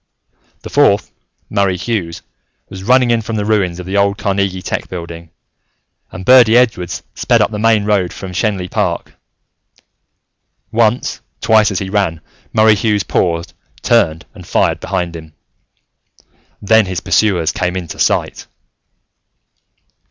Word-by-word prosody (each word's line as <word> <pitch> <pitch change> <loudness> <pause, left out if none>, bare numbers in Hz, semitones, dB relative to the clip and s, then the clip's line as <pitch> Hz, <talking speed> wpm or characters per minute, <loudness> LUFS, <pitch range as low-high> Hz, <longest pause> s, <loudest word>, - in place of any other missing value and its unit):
The - - -8
fourth, - - +3 0.4
Murray 100 -3 0
Hughes, 90 -5 -3 0.5
was 95 - -9
running 125 +2 +3
in 115 -1 +2
from 110 +1 -5
the 105 -1 -2
ruins 95 -5 0
of 90 - -7
the 95 +2 -2
old 100 0 +2
Carnegie 95 -2 -1
Tech - - -4
buildings, 85 -2 -8 0.8
and 95 - -8
Birdy 120 -3 +6
Edwards 90 -9 0
sped - - +1
up - - +1
the 105 - -4
main 110 -1 +2
road 100 -4 +1
from 95 - -8
Schenley 95 -2 -1
Park. - - -2 1.6
Once, 115 +2 0 0.2
twice, 110 -1 +3
as 100 - -3
he 95 0 -4
ran, 95 -6 0 0.3
Murray 110 0 +5
Hughes 105 -1 0
paused, 85 -2 -1 0.3
turned, 80 +1 +2
and - - -13
fired - - +1
behind 85 -1 -3
him. 80 -1 -11 1.3
Then 110 0 +4
his 95 -2 -3
pursuers 90 -7 +1
came 90 +3 -2
into 90 -3 -6
sight! - - 0
100 Hz, 135 wpm, -16 LUFS, 90-110 Hz, 1.6 s, Birdy